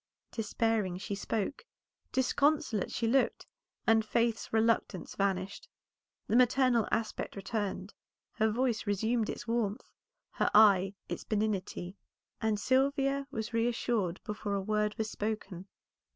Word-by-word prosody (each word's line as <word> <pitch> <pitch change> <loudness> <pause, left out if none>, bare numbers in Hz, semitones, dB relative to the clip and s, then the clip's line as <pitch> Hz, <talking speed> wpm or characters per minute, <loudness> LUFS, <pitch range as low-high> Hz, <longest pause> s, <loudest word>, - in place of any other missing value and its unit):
Despairing 220 -4 0
she 205 +2 -5
spoke, 210 - -2 0.5
disconsolate 270 - +1
she 230 - -1
looked, 260 +4 +2 0.4
and 225 -1 +4
Faith's 230 +1 0
reluctance 220 -5 +1
vanished. 195 0 -2 0.6
The - - 0
maternal 250 -1 +4
aspect 220 -1 -2
returned, 200 -1 -3 0.4
her 220 +1 +1
voice 235 0 0
resumed 220 +3 +1
its 240 - -5
warmth, 230 -1 -1 0.4
her - - +1
eye 200 -2 +6
its - - -5
benignity, 200 -3 -2 0.4
and 220 -2 +1
Sylvia 275 +3 +1
was 220 -3 -5
reassured 230 -5 0
before 210 -1 -3
a - - 0
word 210 +1 0
was 220 - -1
spoken. 205 -4 -4
220 Hz, 120 wpm, -31 LUFS, 205-235 Hz, 0.6 s, eye